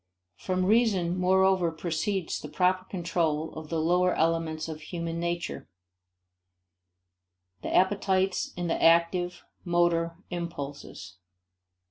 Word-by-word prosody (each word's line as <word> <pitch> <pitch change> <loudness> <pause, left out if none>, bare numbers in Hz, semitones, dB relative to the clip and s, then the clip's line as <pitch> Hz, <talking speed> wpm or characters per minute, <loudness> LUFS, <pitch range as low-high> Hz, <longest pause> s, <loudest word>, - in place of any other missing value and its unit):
From 185 - -1
reason 200 -5 +2
moreover 185 -1 +3
proceeds 170 +3 -2
the - - -8
proper 185 0 +1
control 165 -4 -1
of 155 -1 -8
the 165 - -1
lower 180 +3 +2
elements 160 -1 0
of 155 -1 -7
human 170 +1 -4
nature 170 0 -3 1.9
the - - -4
appetites 190 0 +1
and 175 -1 -2
the 165 - -1
active, 170 +2 +3 0.2
motor, 170 -1 +1
impulses. 145 - -6
175 Hz, 105 wpm, -28 LUFS, 165-185 Hz, 1.9 s, moreover